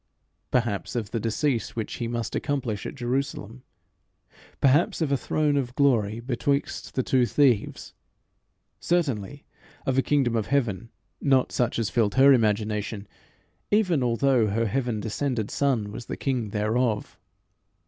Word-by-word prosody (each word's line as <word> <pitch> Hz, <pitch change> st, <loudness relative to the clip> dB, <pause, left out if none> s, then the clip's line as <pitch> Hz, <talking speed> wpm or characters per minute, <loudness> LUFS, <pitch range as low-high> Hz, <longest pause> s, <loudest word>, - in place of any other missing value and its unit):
Perhaps 115 Hz, -3 st, -1 dB
of 110 Hz, -4 st, -3 dB
the 115 Hz, -, -1 dB
decease 115 Hz, +3 st, -1 dB
which 110 Hz, -2 st, -4 dB
he 120 Hz, -, -3 dB
must 115 Hz, -2 st, -3 dB
accomplish 125 Hz, -8 st, -2 dB
at -, -, -7 dB
Jerusalem; 125 Hz, -2 st, -3 dB, 1.0 s
perhaps 145 Hz, +5 st, +3 dB
of 155 Hz, -4 st, 0 dB
a -, -, +4 dB
throne 145 Hz, +3 st, 0 dB
of 125 Hz, -2 st, -2 dB
glory 115 Hz, -7 st, +2 dB
betwixt 135 Hz, +3 st, -2 dB
the 130 Hz, -, +1 dB
two 125 Hz, -1 st, +2 dB
thieves; 130 Hz, -7 st, +1 dB, 0.9 s
certainly 140 Hz, -, -1 dB, 0.4 s
of 135 Hz, 0 st, +2 dB
a -, -, +5 dB
kingdom 135 Hz, -5 st, +1 dB
of 110 Hz, -2 st, -1 dB
heaven 120 Hz, -5 st, -1 dB, 0.3 s
not 135 Hz, -2 st, +2 dB
such 120 Hz, -2 st, 0 dB
as 115 Hz, -3 st, -1 dB
filled 110 Hz, -4 st, +1 dB
her 135 Hz, +1 st, +7 dB
imagination, 105 Hz, -2 st, 0 dB, 0.6 s
even 185 Hz, -8 st, +2 dB
although 125 Hz, -1 st, +2 dB
her 115 Hz, +3 st, 0 dB
heaven 120 Hz, 0 st, -1 dB
descended 115 Hz, 0 st, -2 dB
Son 125 Hz, -8 st, 0 dB
was 115 Hz, +2 st, -8 dB
the -, -, -5 dB
king 125 Hz, -6 st, -1 dB
thereof. 110 Hz, +2 st, -1 dB
120 Hz, 140 wpm, -26 LUFS, 110-140 Hz, 1.0 s, her